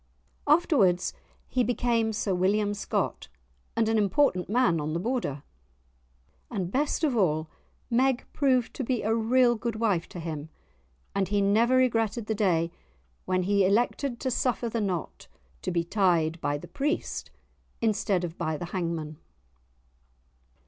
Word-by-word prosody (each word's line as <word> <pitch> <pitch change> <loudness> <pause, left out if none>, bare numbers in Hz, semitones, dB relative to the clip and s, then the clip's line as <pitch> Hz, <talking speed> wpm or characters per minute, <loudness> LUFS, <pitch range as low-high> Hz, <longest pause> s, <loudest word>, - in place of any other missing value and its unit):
Afterwards 270 - +3 0.3
he 255 - +1
became 235 -2 +1
Sir 205 -2 -1
William 205 +3 +1
Scott, 205 - -2 0.5
and 225 -1 +2
an 225 0 +2
important 200 -2 +2
man 205 -8 +2
on 150 +1 -3
the 170 - -1
Border. 185 - -2 1.1
And, 190 -6 -3
best 295 +6 0
of 285 -5 +2
all, 155 -7 +1 0.4
Meg 255 +1 +2
proved 255 -5 +2
to 270 - -4
be 250 -1 -1
a 220 +2 +1
real 240 +2 +3
good 235 0 -3
wife 205 -7 0
to 175 - -8
him, 160 -2 -5 0.6
and 195 -1 0
he 205 +2 +1
never 220 +5 +3
regretted 230 -3 +1
the 220 - -1
day 175 -6 +1 0.5
when 185 0 +1
he 200 +1 +3
elected 240 +5 +1
to 260 - -1
suffer 245 -1 0
the 230 0 -2
knot 185 -5 -3 0.3
to - - -3
be 170 -1 0
tied 170 -4 +1
by 145 - 0
the - - -10
priest 295 +5 -2 0.5
instead 210 -4 +1
of 170 -1 -5
by 155 -1 -1
the 175 - -5
hangman. 165 -4 -3
210 Hz, 150 wpm, -27 LUFS, 175-240 Hz, 1.1 s, Afterwards